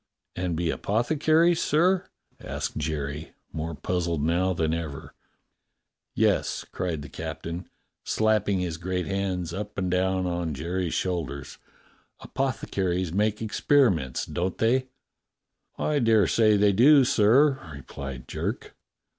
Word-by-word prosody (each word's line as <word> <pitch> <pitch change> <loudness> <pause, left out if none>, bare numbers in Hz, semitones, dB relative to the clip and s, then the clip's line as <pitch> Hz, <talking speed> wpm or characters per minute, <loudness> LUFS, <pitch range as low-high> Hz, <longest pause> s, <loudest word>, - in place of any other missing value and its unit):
"And 90 -2 -2
be 85 0 0
apothecaries, 155 +9 +2
sir.^" 180 +5 +2 0.3
asked - - -4
Jerry, 75 0 -4 0.2
more 80 +1 -4
puz 90 +2 -2
zled 85 -3 -1
now 85 +4 +2
than 80 -2 0
ever. 80 -4 -5 1.0
"Yes," - - +1
cried 80 -5 -3
the - - -8
captain, 85 +6 -6 0.3
slapping 110 -2 +1
his 85 -3 -3
great 90 +1 -2
hands 95 -3 -2
up 105 +2 -6
and 95 -2 -1
down 95 0 +1
upon 85 -3 -2
Jerry's 85 +4 -2
shoulders. 75 -7 -3 0.6
"Apothecaries 95 -9 -2
make 105 +2 0
experiments, 105 - +2
don't 90 +1 -3
they.^" 130 +3 +2 0.9
"I 150 -1 0
dare 110 -5 +4
say 110 +3 +4
they 100 0 +4
do, 135 +7 +6
sir," 130 +6 +4
replied 70 -2 -8
Jerk. - - -4
95 Hz, 120 wpm, -26 LUFS, 80-110 Hz, 1.0 s, do